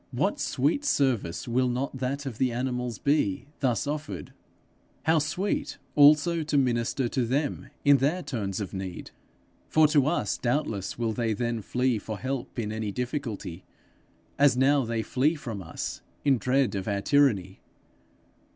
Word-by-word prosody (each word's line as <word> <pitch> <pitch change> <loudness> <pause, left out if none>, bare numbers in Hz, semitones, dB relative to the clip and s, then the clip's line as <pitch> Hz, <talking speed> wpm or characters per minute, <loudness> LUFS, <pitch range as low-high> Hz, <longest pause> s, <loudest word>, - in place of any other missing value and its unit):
What - - 0
sweet 150 - 0
service 130 - 0
will 125 +2 +2
not 130 +3 -2
that 135 +2 -2
of 125 -5 -6
the 130 -2 +2
animals 125 -1 -2
be, 135 -7 +1
thus 125 -5 +1
offered! 145 - -5 0.7
How 160 0 +4
sweet 180 +7 -2 0.2
also 150 +3 +6
to 150 -1 0
minister 120 -1 +1
to 130 - 0
them 135 +5 -1 0.2
in 140 0 +7
their 150 +8 0
turns 100 -6 -3
of 100 -3 -5
need! 95 -2 -6 0.6
For 155 -1 +5
to 145 -3 +3
us 150 - 0
doubtless 120 -6 -1
will 115 -2 -1
they 115 -1 0
then 115 +1 -2
flee 125 +2 0
for 110 +1 -6
help 130 +1 -4
in 110 -3 -2
any 110 -1 -3
difficulty, 110 - -4 0.8
as 140 -3 +5
now 135 0 +4
they 115 -1 -1
flee 145 +8 +1
from 120 -9 -6
us 85 -2 -5 0.2
in 135 -4 +4
dread 130 +1 +2
of 95 -2 -3
our 100 -1 0
tyranny. 105 -9 +2
125 Hz, 155 wpm, -27 LUFS, 110-145 Hz, 0.8 s, in